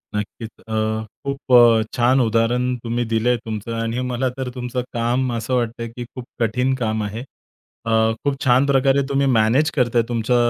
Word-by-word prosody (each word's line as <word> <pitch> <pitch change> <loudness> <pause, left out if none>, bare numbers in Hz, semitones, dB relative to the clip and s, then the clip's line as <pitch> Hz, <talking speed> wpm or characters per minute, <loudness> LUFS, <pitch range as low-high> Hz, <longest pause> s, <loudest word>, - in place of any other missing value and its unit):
नक्कीच, 105 +2 -4 0.2
अ, 110 - -5 0.5
खूप 140 -1 -3
अ, 120 -2 +7
छान 125 +2 +3
उदाहरण 120 +2 +1
तुम्ही 120 +1 -1
दिलंय 120 +2 +2
तुमचं 110 +1 -5
आणि 115 +2 -2
मला 125 +1 0
तर 130 -1 -3
तुमचं 125 0 -3
काम 120 +2 0
असं 115 +2 -3
वाटतंय, 115 -1 -2
की 120 +2 -7
खूप 125 -2 -7
कठीण 125 +3 +1
काम 110 -1 -1
आहे. 105 +3 -5 0.6
अ, 115 - -1 0.3
खूप 140 -1 -1
छान 130 +2 +4
प्रकारे 135 0 +3
तुम्ही 140 0 +1
मॅनेज 130 +9 +3
करताय. 120 -3 +2
तुमचं 120 +1 0
120 Hz, 165 wpm, -21 LUFS, 115-130 Hz, 0.6 s, अ